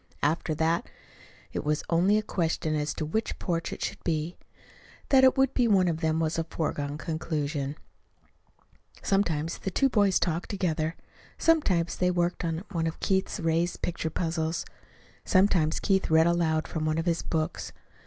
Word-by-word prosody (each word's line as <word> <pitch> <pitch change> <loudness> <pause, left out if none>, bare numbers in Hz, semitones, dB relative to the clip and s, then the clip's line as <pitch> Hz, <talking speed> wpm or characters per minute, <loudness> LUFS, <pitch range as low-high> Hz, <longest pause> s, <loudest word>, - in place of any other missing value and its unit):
After 155 +1 +1
that 160 +2 0 0.6
it - - -2
was 150 +1 0
only 180 +5 +3
a 215 - 0
question 165 -5 -1
as 150 0 -1
to 155 - -3
which 220 +9 -2
porch 170 -3 -2
it - - -5
should - - -4
be. 160 +1 -1 0.7
That 265 -1 +6
it 260 +1 +6
would 270 -1 +3
be 245 -2 +3
one 190 -4 +4
of 165 -2 -1
them 160 -1 +1
was 160 0 0
a - - +1
foregone 150 -3 -3
conclusion. 150 -3 -3 1.3
Sometimes 170 -5 0
the - - -3
two 270 +7 +2
boys 205 -6 +3
talked 170 0 -1
together. 165 -5 -1 0.4
Sometimes 190 - +2
they 180 - +2
worked 175 0 0
on 165 +1 -2
one 165 -3 0
of 160 - -5
Keith's 190 +1 0
raised 165 +1 0
picture 165 -2 -2
puzzles. 165 0 -2 0.6
Sometimes 185 -5 +3
Keith 190 -1 +1
read 160 0 +5
aloud 165 -2 +1
from 160 - -3
one 155 0 0
of 165 - -1
his 170 -1 +1
books. 155 -1 -2
165 Hz, 165 wpm, -28 LUFS, 160-185 Hz, 1.3 s, That